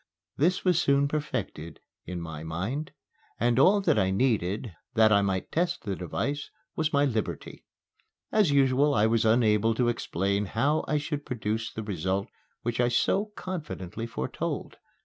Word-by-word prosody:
This 175 Hz, +7 st, +1 dB
was 180 Hz, -2 st, +4 dB
soon 140 Hz, -1 st, +3 dB
perfected 140 Hz, -, -4 dB, 0.3 s
in 90 Hz, 0 st, -4 dB
my 80 Hz, -2 st, -6 dB
mind; 95 Hz, -, -3 dB, 0.5 s
and 120 Hz, +2 st, +2 dB
all 200 Hz, +8 st, +5 dB
I 95 Hz, -3 st, +3 dB
needed, 105 Hz, -1 st, 0 dB, 0.2 s
that 110 Hz, -1 st, +5 dB
I 100 Hz, -1 st, +5 dB
might 95 Hz, -2 st, -1 dB
test 175 Hz, +1 st, 0 dB
the 100 Hz, -3 st, -2 dB
device, 115 Hz, -, -3 dB, 0.3 s
was 160 Hz, -1 st, 0 dB
my 140 Hz, 0 st, +3 dB
liberty. 115 Hz, -6 st, -3 dB, 0.7 s
As 210 Hz, -6 st, +4 dB
usual 140 Hz, +1 st, +3 dB
I 105 Hz, 0 st, +4 dB
was 115 Hz, 0 st, +2 dB
unable 110 Hz, -1 st, +3 dB
to 120 Hz, 0 st, +2 dB
explain 100 Hz, -3 st, -1 dB
how 140 Hz, +10 st, +1 dB
I 150 Hz, -, +1 dB
should 145 Hz, 0 st, -3 dB
produce 110 Hz, -3 st, -3 dB
the 110 Hz, -, -5 dB
result 95 Hz, 0 st, -2 dB, 0.3 s
which 120 Hz, 0 st, -2 dB
I 120 Hz, -, +3 dB
so 190 Hz, -, +2 dB
confidently 150 Hz, -, -5 dB
foretold. 65 Hz, -, -4 dB
115 Hz, 150 wpm, -28 LUFS, 100-145 Hz, 0.7 s, all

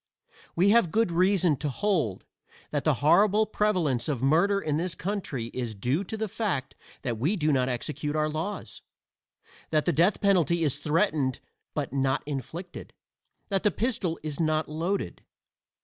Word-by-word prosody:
We 185 Hz, +4 st, +4 dB
have 215 Hz, -5 st, +5 dB
good 220 Hz, +1 st, +1 dB
reason 180 Hz, -3 st, +3 dB
to 150 Hz, -, -2 dB
hold 155 Hz, -, -1 dB, 0.5 s
that -, -, -2 dB
the -, -, +3 dB
horrible 210 Hz, +6 st, +5 dB
prevalence 175 Hz, -, 0 dB
of 130 Hz, -4 st, -2 dB
murder 175 Hz, +8 st, +3 dB
in 150 Hz, -6 st, -1 dB
this 175 Hz, +1 st, -2 dB
country 150 Hz, -, -4 dB
is 120 Hz, -4 st, -3 dB
due 125 Hz, -, 0 dB
to 220 Hz, -, -5 dB
the 220 Hz, 0 st, -2 dB
fact 185 Hz, -, -2 dB, 0.3 s
that 120 Hz, -3 st, -2 dB
we 160 Hz, -, +1 dB
do 155 Hz, -5 st, +1 dB
not 130 Hz, -1 st, +2 dB
execute 145 Hz, +4 st, -3 dB
our 155 Hz, 0 st, +2 dB
laws 160 Hz, +7 st, -5 dB, 0.9 s
that 155 Hz, -1 st, +1 dB
the 175 Hz, -, +2 dB
death 175 Hz, +7 st, +3 dB
penalty 175 Hz, -4 st, +3 dB
is 145 Hz, -2 st, 0 dB
threatened 150 Hz, -4 st, +1 dB, 0.4 s
but -, -, -2 dB
not 135 Hz, -1 st, +1 dB
inflicted 150 Hz, +6 st, -6 dB, 0.6 s
that 195 Hz, -2 st, +1 dB
the 210 Hz, -, +3 dB
pistol 210 Hz, -6 st, -1 dB
is 150 Hz, -2 st, -4 dB
not 155 Hz, -1 st, +1 dB
loaded. 170 Hz, +6 st, -3 dB
160 Hz, 160 wpm, -27 LUFS, 140-195 Hz, 0.9 s, have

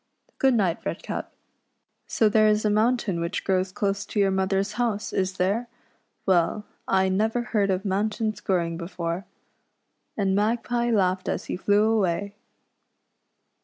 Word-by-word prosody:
Good 265 Hz, -2 st, +4 dB
night. 185 Hz, -6 st, 0 dB
Redcap. -, -, -4 dB, 0.8 s
So 220 Hz, -, +2 dB
there 215 Hz, 0 st, +4 dB
is 215 Hz, 0 st, +2 dB
a 210 Hz, -, +3 dB
mountain 215 Hz, -4 st, +1 dB
which 170 Hz, +3 st, -2 dB
grows 185 Hz, -1 st, 0 dB
close 200 Hz, +1 st, -1 dB
to 210 Hz, -, -2 dB
your 195 Hz, -1 st, +3 dB
mother's 190 Hz, +1 st, 0 dB
house, 215 Hz, -4 st, -1 dB
is 190 Hz, 0 st, 0 dB
there 205 Hz, +7 st, 0 dB, 0.3 s
} -, -, -45 dB
Well, 190 Hz, +3 st, +2 dB, 0.2 s
I 190 Hz, 0 st, +3 dB
never 220 Hz, +5 st, +1 dB
heard 210 Hz, -4 st, 0 dB
of 190 Hz, +1 st, -1 dB
mountains 210 Hz, +2 st, -1 dB
growing 170 Hz, -3 st, 0 dB
before." 170 Hz, +1 st, -4 dB, 0.9 s
And 195 Hz, -2 st, +1 dB
Magpie 235 Hz, +3 st, 0 dB
laughed 185 Hz, -4 st, +1 dB
as -, -, -2 dB
he -, -, -3 dB
flew 205 Hz, +3 st, +2 dB
away. 200 Hz, -3 st, +1 dB
200 Hz, 145 wpm, -25 LUFS, 185-215 Hz, 0.9 s, Good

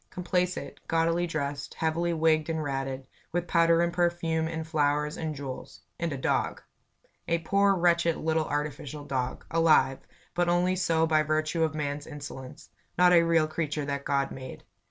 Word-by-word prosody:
Complacent, 180 Hz, 0 st, -2 dB
gaudily 165 Hz, +1 st, +1 dB
dressed, 145 Hz, -3 st, -4 dB
heavily 165 Hz, +2 st, 0 dB
wigged 160 Hz, -1 st, +2 dB
and 160 Hz, -1 st, -1 dB
ratted, 135 Hz, -1 st, -3 dB, 0.3 s
with 175 Hz, +1 st, -1 dB
powder 165 Hz, 0 st, +4 dB
and 170 Hz, 0 st, -1 dB
perfume 170 Hz, -2 st, 0 dB
and 160 Hz, 0 st, -4 dB
flowers 150 Hz, -1 st, +1 dB
and 155 Hz, -3 st, -4 dB
jewels 135 Hz, -2 st, -7 dB, 0.2 s
and 170 Hz, -1 st, -1 dB
a 140 Hz, -, -3 dB
dog. 130 Hz, -, 0 dB, 0.7 s
A 170 Hz, -, +2 dB
poor, 195 Hz, +4 st, +2 dB
wretched, 170 Hz, -2 st, +2 dB
little, 160 Hz, 0 st, 0 dB
artificial 145 Hz, 0 st, -4 dB
dog 130 Hz, -3 st, -3 dB
alive, 160 Hz, -5 st, +4 dB, 0.3 s
but 175 Hz, 0 st, +1 dB
only 180 Hz, +1 st, +2 dB
so 165 Hz, -3 st, +2 dB
by 155 Hz, -1 st, +3 dB
virtue 155 Hz, +2 st, 0 dB
of 155 Hz, -1 st, 0 dB
man's 145 Hz, -1 st, -3 dB
insolence; 145 Hz, -4 st, -9 dB, 0.3 s
not 180 Hz, 0 st, +6 dB
a 170 Hz, -, +7 dB
real 165 Hz, -2 st, +3 dB
creature 155 Hz, -2 st, -2 dB
that 140 Hz, 0 st, -3 dB
God 140 Hz, -1 st, 0 dB
made. 130 Hz, -1 st, -8 dB
160 Hz, 160 wpm, -28 LUFS, 145-170 Hz, 0.7 s, a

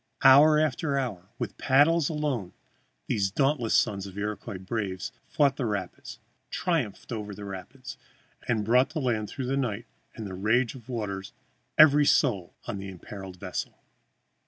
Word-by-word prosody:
Hour 145 Hz, +3 st, +8 dB
after 150 Hz, -1 st, +1 dB
hour, 105 Hz, -9 st, -3 dB
with -, -, -5 dB
paddles 145 Hz, +4 st, +4 dB
alone, 145 Hz, -, -2 dB, 0.5 s
these 100 Hz, -, 0 dB
dauntless 135 Hz, +1 st, +1 dB
sons 100 Hz, -3 st, +1 dB
of 95 Hz, 0 st, -11 dB
Iroquois 105 Hz, 0 st, -4 dB
braves 95 Hz, +1 st, -4 dB, 0.2 s
fought 140 Hz, -4 st, +2 dB
the 130 Hz, -, -1 dB
rapids, 100 Hz, -4 st, -5 dB, 0.3 s
triumphed 140 Hz, -, -2 dB
over 105 Hz, -3 st, -5 dB
the 105 Hz, -, -8 dB
rapids, 120 Hz, +7 st, -8 dB, 0.5 s
and 110 Hz, -3 st, 0 dB
brought 125 Hz, +4 st, +4 dB
to 155 Hz, +1 st, -4 dB
land 115 Hz, -6 st, -1 dB
through 130 Hz, -, -5 dB
the 135 Hz, +2 st, 0 dB
night 120 Hz, -7 st, -2 dB, 0.3 s
and 110 Hz, -, -6 dB
the 95 Hz, -, -6 dB
rage 115 Hz, +6 st, +1 dB
of 130 Hz, -2 st, -13 dB
waters 100 Hz, -5 st, -4 dB, 0.4 s
every 145 Hz, -1 st, +7 dB
soul 100 Hz, -, +2 dB
on 100 Hz, -, -4 dB
that 95 Hz, -, -6 dB
imperiled 95 Hz, 0 st, -9 dB
vessel! -, -, -5 dB
115 Hz, 155 wpm, -27 LUFS, 100-135 Hz, 0.5 s, Hour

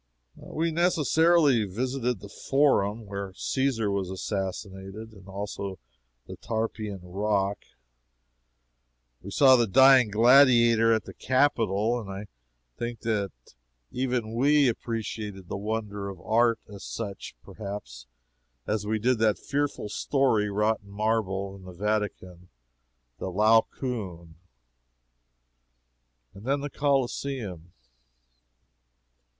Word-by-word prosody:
We 165 Hz, +1 st, -3 dB
necessarily 160 Hz, -5 st, +3 dB
visited 125 Hz, +3 st, -2 dB
the 100 Hz, -, -9 dB, 0.2 s
Forum, 115 Hz, -6 st, +2 dB
where 100 Hz, -1 st, -6 dB
Caesar 130 Hz, -6 st, 0 dB
was 100 Hz, -2 st, -2 dB
assassinated, 95 Hz, +2 st, -5 dB
and 95 Hz, -2 st, -15 dB
also 100 Hz, -1 st, -5 dB, 0.5 s
the -, -, -9 dB
Tarpeian 110 Hz, -3 st, -3 dB
Rock. 100 Hz, +2 st, -1 dB, 1.6 s
We 100 Hz, -, -8 dB
saw 130 Hz, +5 st, +6 dB
the 120 Hz, -2 st, +2 dB
Dying 130 Hz, +1 st, +6 dB
Gladiator 115 Hz, 0 st, +5 dB
at 110 Hz, -1 st, +2 dB
the -, -, -10 dB
Capitol, 120 Hz, -4 st, +1 dB
and 105 Hz, -4 st, -8 dB
I 95 Hz, +2 st, -6 dB, 0.5 s
think 120 Hz, -2 st, -5 dB
that 105 Hz, -4 st, -1 dB, 0.6 s
even 125 Hz, -3 st, -2 dB
we 140 Hz, +4 st, +4 dB
appreciated 110 Hz, -5 st, -4 dB
that -, -, -3 dB
wonder 105 Hz, -1 st, -4 dB
of 95 Hz, -3 st, -9 dB
art; 115 Hz, +4 st, +2 dB
as 100 Hz, -2 st, -8 dB
much, 100 Hz, -4 st, -6 dB
perhaps, 100 Hz, -, -8 dB, 0.6 s
as 105 Hz, -1 st, -2 dB
we 110 Hz, +1 st, +1 dB
did 120 Hz, +2 st, +1 dB
that 110 Hz, -2 st, +3 dB
fearful 145 Hz, -5 st, -2 dB
story 110 Hz, -1 st, +1 dB
wrought 105 Hz, +2 st, +1 dB
in 100 Hz, -, -17 dB
marble, 100 Hz, -2 st, -1 dB
in 100 Hz, -, -13 dB
the 90 Hz, 0 st, -10 dB
Vatican 95 Hz, -3 st, -3 dB, 0.7 s
the -, -, -4 dB
Laocoon. 105 Hz, -4 st, 0 dB, 2.0 s
And 100 Hz, -, -13 dB
then 140 Hz, +3 st, 0 dB
the 145 Hz, 0 st, -5 dB
Coliseum. 130 Hz, -, -2 dB
110 Hz, 110 wpm, -27 LUFS, 100-125 Hz, 2.0 s, saw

